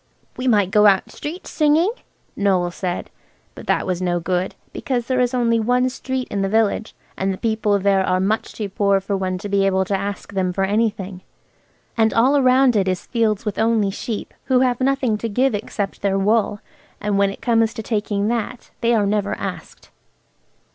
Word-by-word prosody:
"We 255 - -3
might 205 -6 +3
go 210 0 +6
out 195 -2 +3
street 325 +5 -7
singing," 315 +5 +2 0.4
Noël 185 -3 +1
said. 180 -1 -4 0.4
But - - -11
that - - +1
was 185 -1 -2
no 175 -1 0
good, 180 +2 -2 0.2
because 245 -3 -2
there 255 +1 0
is 245 -1 +2
only 235 -3 +2
one 250 +3 +2
street 260 0 -4
in 200 - -1
the 195 - 0
village, 220 0 0 0.2
and 195 +1 -1
the 190 - -4
people 220 -2 +1
there 195 -1 +2
are 185 0 +1
much 210 +4 -1
too 210 - -4
poor 200 0 +2
for 195 +1 -3
one 185 -1 -2
to 195 - -6
be 200 -1 +2
able 190 -1 +2
to 195 - -1
ask 200 +1 -5
them 185 -2 0
for 195 - 0
anything. 200 -2 -1 0.7
And 220 -2 +2
all 270 +5 +4
round 255 -1 +4
it 195 -2 +2
is 185 -1 -2
fields 225 -3 0
with 210 -2 -3
only 220 -3 +2
sheep, 210 +2 -5
who 255 -1 +3
have 255 -1 +1
nothing 260 -5 +1
to 230 - -3
give 255 +4 +1
except 205 -1 -4
their 195 -1 +1
wool, 205 +1 +1 0.4
and 205 -1 0
when 200 0 +3
it 195 - -8
comes 225 -2 +2
to 220 - -5
taking 205 -2 -1
that, 235 +1 -3
they 235 0 +3
are 210 -2 +2
never 205 0 0
asked. - - -7
210 Hz, 195 wpm, -21 LUFS, 195-235 Hz, 0.7 s, go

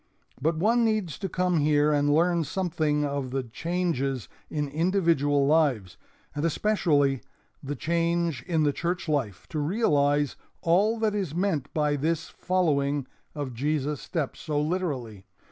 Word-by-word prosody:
But 160 +3 +1
one 230 +7 +3
needs 215 - 0
to 195 - -3
come 180 -1 +1
here 150 0 +3
and 145 0 +2
learn 170 +2 +3
something 155 -3 0
of 140 -2 -2
the 135 +1 -2
changes 140 - -2 0.2
in 150 -1 -2
individual 160 -3 +2
lives, 135 - +2 0.4
and 145 - -3
especially 150 - +2 0.4
the 145 +1 -4
change 170 -1 0
in 165 -3 +2
the 145 -1 +2
church 175 +3 -2
life, 135 -11 -1
to 155 - -3
realize 145 - +2 0.3
all 200 +7 +3
that 220 -2 +1
is 190 -7 -2
meant 175 -7 -1
by 150 -1 +1
this 160 +3 -1
following 145 -7 0 0.3
of 140 -4 -4
Jesus' 145 +3 -1
steps 155 -6 -3
so 150 -3 -1
literally. 145 - -2
155 Hz, 145 wpm, -27 LUFS, 145-175 Hz, 0.4 s, one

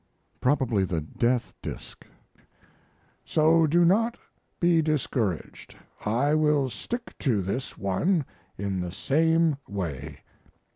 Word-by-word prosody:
[Probably 125 -7 +2
"The 85 -4 -1
Death 120 +10 -1
Disk:"] - - -8 1.2
So 160 +1 +4
do 170 +3 +4
not 225 +7 +3 0.4
be 170 -2 +4
discouraged; 130 - -2 0.3
I 125 +8 +1
will 150 -4 +2
stick 240 - -6
to 110 -9 +1
this 125 +9 -4
one 140 - +1 0.3
in 100 -1 -2
the 90 -1 -3
same 160 - +2
way. 80 -7 -5
135 Hz, 105 wpm, -26 LUFS, 100-160 Hz, 1.2 s, So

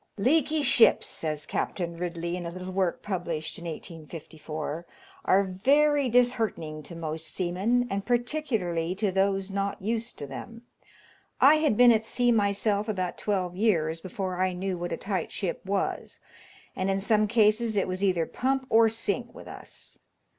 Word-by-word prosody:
"Leaky 300 +6 +2
ships," 250 -3 +5
says 155 -2 -4
Captain 170 -2 -3
Ridley, 170 0 -3
in 180 - -5
a - - -3
little 185 +2 -7
work 185 -2 0
published 170 -6 -3
in 170 - -10
1854, 160 -1 -7 0.4
"are 195 +2 +4
very 275 +9 +2
disheartening 225 -11 +1
to 170 +3 -8
most 160 -1 -4
seamen, 195 +7 0
and 200 -3 -3
particularly 225 - -1
to 205 0 0
those 195 0 0
not 200 0 -2
used 225 +3 -3
to 145 - -5
them. 230 - -9 0.8
I 290 +3 +7
had 305 -9 +1
been 245 -1 +8
at 220 -1 +2
sea 245 +2 +1
myself 205 0 +1
about 185 -4 -2
twelve 185 -4 -1
years 165 -6 +1
before 185 0 -4
I 185 0 +1
knew 185 +1 -3
what 175 0 -5
a - - -2
tight 195 -2 -3
ship 190 -4 -3
was, 195 0 -2 0.6
and 185 +1 -1
in 195 0 +1
some 215 +1 +2
cases 220 0 +2
it 195 - +1
was 185 +1 -3
either 180 -4 +2
pump 265 +6 -1
or 225 0 +6
sink 230 +1 -3
with - - -11
us." - - -11
195 Hz, 160 wpm, -27 LUFS, 175-230 Hz, 0.8 s, been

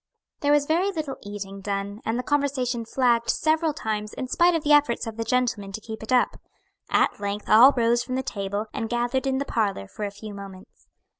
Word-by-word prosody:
There 290 - +1
was 295 -1 +4
very 340 +6 +1
little 305 -7 -4
eating 200 -1 -7
done, 200 +1 -4
and 225 +1 0
the 250 - -2
conversation 260 -4 0
flagged 235 -1 +1
several 315 +1 +2
times 210 -5 -4
in 255 - -4
spite 345 +6 +3
of 325 - -1
the 295 - +4
efforts 290 -5 +3
of 225 -1 -6
the 230 - -2
gentlemen 225 -4 0
to 220 - -4
keep 220 0 -8
it 220 - -7
up. 250 -1 +2 0.5
At - - +2
length 205 0 -4
all 235 +6 +8
rose 235 0 +3
from 255 - -4
the 260 - -1
table, 205 -3 -3
and 225 - -3
gathered 245 +3 0
in 265 0 +1
the 280 - -2
parlor 205 - -1
for 210 - -8
a 205 - -1
few 205 +1 -9
moments. 195 -1 -12
235 Hz, 215 wpm, -25 LUFS, 205-270 Hz, 0.5 s, all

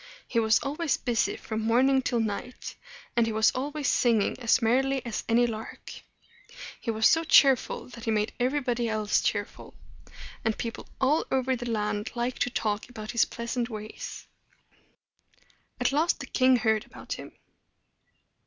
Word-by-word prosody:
He 230 - +1
was 220 -1 +4
always 295 +2 -1
busy 240 -3 0
from 220 0 -4
morning 255 +4 +3
till 245 -2 0
night, 225 +3 -4 0.4
and 235 -1 +3
he - - -1
was 220 0 +3
always 285 +2 -3
singing 230 -4 +2
as 235 0 +3
merrily 260 +3 +1
as 230 -2 -3
any 235 +1 +4
lark. 225 -2 -6 0.9
He - - -6
was 220 -1 +1
so 325 +1 +5
cheerful 270 -5 +4
that 235 -1 -10
he - - -1
made 215 -1 0
everybody 245 -2 0
else 215 -1 +1
cheerful; - - -3 0.7
and 220 -1 0
people 230 -1 -5
all 285 +4 +2
over 260 0 +1
the 240 0 -5
land 210 -1 -2
liked 240 +1 -2
to - - +2
talk 215 -1 -2
about 215 -2 -7
his 235 -2 +3
pleasant 235 +1 -3
ways. 215 -1 -7 1.5
At 250 - +2
last 310 +5 +1
the - - -5
king 255 0 +3
heard 220 -2 +1
about - - -7
him. - - -9
235 Hz, 155 wpm, -27 LUFS, 220-260 Hz, 1.5 s, so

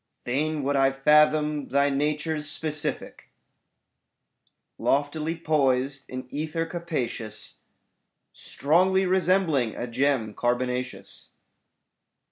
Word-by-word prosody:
Fain 150 +4 -1
would 140 +1 0
I 135 0 +4
fathom 150 +1 +3
thy 140 +1 +2
nature's 150 +1 -1
specific 155 0 -3 1.5
Loftily 150 +3 0
poised 140 -4 0
in 130 0 -6
ether 155 +2 -2
capacious. 160 -10 -5 0.8
Strongly 185 +6 +1
resembling 180 - +2
a - - -4
gem 125 -3 0
carbonaceous. 125 +1 -3
145 Hz, 85 wpm, -26 LUFS, 130-155 Hz, 1.5 s, I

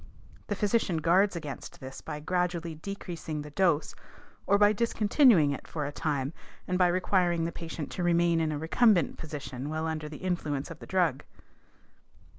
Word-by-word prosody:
The 205 - -1
physician 205 -3 +1
guards 180 +5 +3
against 150 -5 -7
this 130 0 -9
by 150 - -6
gradually 175 0 -1
decreasing 165 -3 -6
the 150 - -10
dose 170 -2 +1 0.5
or 200 - +5
by 205 +1 +5
discontinuing 215 - +4
it 140 - -6
for 150 -3 -3
a 145 - -3
time 145 -2 -2 0.3
and 180 - 0
by 180 -1 +4
requiring 175 -2 +1
the 170 - -2
patient 165 -3 -6
to 180 - -3
remain 170 -1 +3
in 160 -1 0
a 150 - -2
recumbent 175 - +3
position 145 -3 -6
while 155 +1 -2
under 155 -1 -3
the 150 - -8
influence 155 -6 -2
of 165 - -9
the - - -11
drug. 175 -8 +1
170 Hz, 170 wpm, -29 LUFS, 150-185 Hz, 0.5 s, or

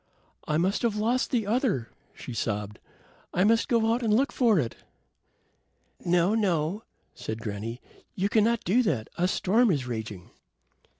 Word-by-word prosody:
"I 150 - +1
must 185 +5 +1
have 230 -3 +1
lost 235 +5 +1
the 235 -5 0
other," 210 - 0 0.3
she 125 - -8
sobbed. 105 -2 -3 0.6
"I 180 - +3
must 225 +2 +3
go 230 -1 +2
out 240 - -1
and 225 -3 0
look 260 +7 +3
for 230 -6 +3
it." 120 -8 -1 1.3
"No, 175 +3 +3
no," 190 -3 0 0.3
said 110 0 -5
granny. 115 +1 -5 0.4
"You 195 +1 +1
cannot 220 +2 +2
do 220 +8 +3
that. 145 - -1
A 180 - +3
storm 215 +5 +2
is 140 -8 0
raging." 110 -6 -6
190 Hz, 155 wpm, -27 LUFS, -, 1.3 s, I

